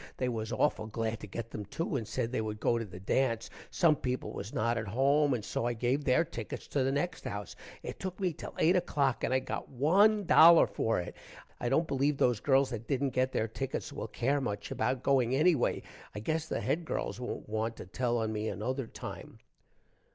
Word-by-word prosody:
they 125 - 0
was 110 -2 -3
auful 110 -7 0
glad 115 0 -2
to - - -8
get 115 +3 -6
them 105 - -5
too 160 - -3
and 115 -5 -2
said 115 0 -2
they 130 - 0
would 105 -1 -4
go 120 +2 +2
to 115 - -3
the 90 -2 -10
dance. 115 +3 0 0.2
some 165 -4 +4
people 125 -2 -3
was 100 +3 -6
not 115 +2 0
at 110 -1 -3
home 140 +5 +3
and 110 -3 -5
so 120 - -1
i 120 - 0
gave 125 +5 0
their 135 +4 +3
tickets 115 -8 -7
to 140 - 0
the 135 - +1
next 165 +4 -2
house. 100 -1 -5 0.3
it - - -6
took 185 0 -5
me 185 -3 0
till 155 - -9
8 175 +3 +4
o'clock 140 -7 0
and - - 0
i 130 - +4
got 130 0 -4
1 195 - +4
dollar 170 -1 +8
for 115 -3 0
it. 90 - -6 0.4
i 120 - -1
dont 155 +5 +2
believe 140 0 +1
those 125 -5 +2
girls 135 0 +3
that 115 -1 -5
dident 135 -2 0
get 130 +1 +1
their 110 - 0
tickets 130 +4 -4
will - - -5
care 140 +3 0
much 105 -6 -4
about 130 -1 -1
going 130 -3 +3
ennyway. 150 -1 +2 0.3
i - - -3
gess 160 +8 -2
the - - -2
Head 170 - 0
girls 155 - -3
wont 125 - -5
want 110 +1 -2
to - - -9
tell 120 +6 -1
on 110 -1 -1
me 105 0 -2
another 115 +6 -3
time. - - -8
130 Hz, 220 wpm, -31 LUFS, 110-145 Hz, 0.4 s, dollar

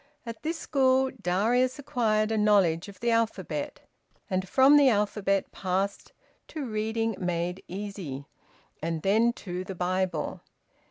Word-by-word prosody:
At 230 -1 -7
this 320 +2 -2
school 265 -3 +2
Darius 235 +8 +1
acquired 225 -7 0
a - - +1
knowledge 195 -6 +3
of 195 -2 -13
the 235 0 +1
alphabet, 230 -1 -1 0.5
and 185 0 -1
from 270 +2 +6
the 285 -2 +7
alphabet 205 -2 0
passed 195 +2 -2 0.4
to 305 -4 -5
Reading 220 0 -1
Made 180 0 -2
Easy, 185 -8 -6 0.6
and 165 0 -3
then 220 +4 +4
to 180 -4 -6
the 190 0 -7
Bible. 180 -2 -1
210 Hz, 130 wpm, -27 LUFS, 185-235 Hz, 0.6 s, the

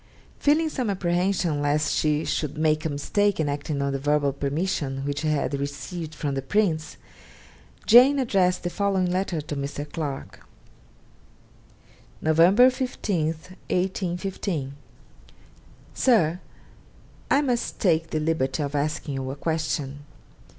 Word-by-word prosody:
Feeling 305 +3 +3
some 255 -7 -2
apprehension 175 -4 0
lest 145 +1 +1
she 150 0 +1
should 150 -1 -2
make 155 0 +1
a - - +1
mistake 205 +8 0
in 155 - +1
acting 145 0 -2
on 140 0 -1
the 135 - -2
verbal 145 0 +1
permission 140 -1 -2
which 145 0 -2
she 155 - -2
had 150 -1 0
received 145 +4 -5
from 145 -2 -2
the 135 - -2
Prince, 155 0 0 0.9
Jane 255 +5 +7
addressed 190 -8 +1
the 175 - -2
following 195 -2 +1
letter 180 -3 -1
to 150 0 -6
Mr. 140 +1 -4
Clarke: 145 -3 -6 1.8
'Nov. 160 0 0 0.4
15, 210 - -1
1815. 180 -2 -3 1.2
'SIR, 180 -10 +3 0.9
I 280 - +4
must 245 -4 -1
take 165 -4 +2
the 155 - -1
liberty 155 -2 0
of 140 0 -4
asking 145 0 -2
you 135 -1 -3
a 135 - -4
question. 150 -3 -2
155 Hz, 130 wpm, -25 LUFS, 145-185 Hz, 1.8 s, Jane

